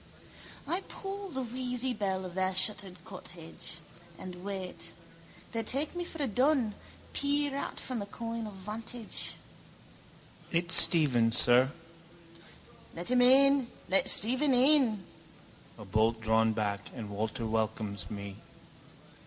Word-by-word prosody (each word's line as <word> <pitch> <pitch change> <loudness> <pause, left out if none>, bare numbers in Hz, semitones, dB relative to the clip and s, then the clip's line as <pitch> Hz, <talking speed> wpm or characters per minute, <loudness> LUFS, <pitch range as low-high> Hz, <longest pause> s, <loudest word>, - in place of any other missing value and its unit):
I 355 +3 0
pull 395 0 -7
the 265 -5 -4
wheezy 250 +1 -3
bell 190 -3 -2
of 180 - -8
their 190 0 -1
shuttered 185 -2 +1
cottage: 165 -1 -6 0.4
and 180 -1 -9
wait. 190 -2 -6 0.6
They 230 - -2
take 275 +9 -1
me 350 - -3
for 325 -3 -5
a - - 0
dun, 250 -1 +1 0.4
peer 285 0 +1
out 280 - -4
from 250 -4 -5
a 200 - -6
coign 230 +1 -5
of 210 - -9
vantage. 215 +4 -3 1.2
—It's 170 +1 0
Stephen, 130 -9 +6
sir. 125 +3 +4 1.2
—Let 175 +7 +1
him 250 0 +4
in. 270 +1 +5 0.2
Let 190 - +3
Stephen 260 +5 +6
in. 250 - +3 0.7
A - - -10
bolt 110 +1 +1
drawn 110 0 +2
back 105 -2 -2
and 110 -5 -7
Walter 110 +3 -3
welcomes 110 -2 -3
me. 100 -1 -7
200 Hz, 130 wpm, -30 LUFS, -, 1.2 s, Stephen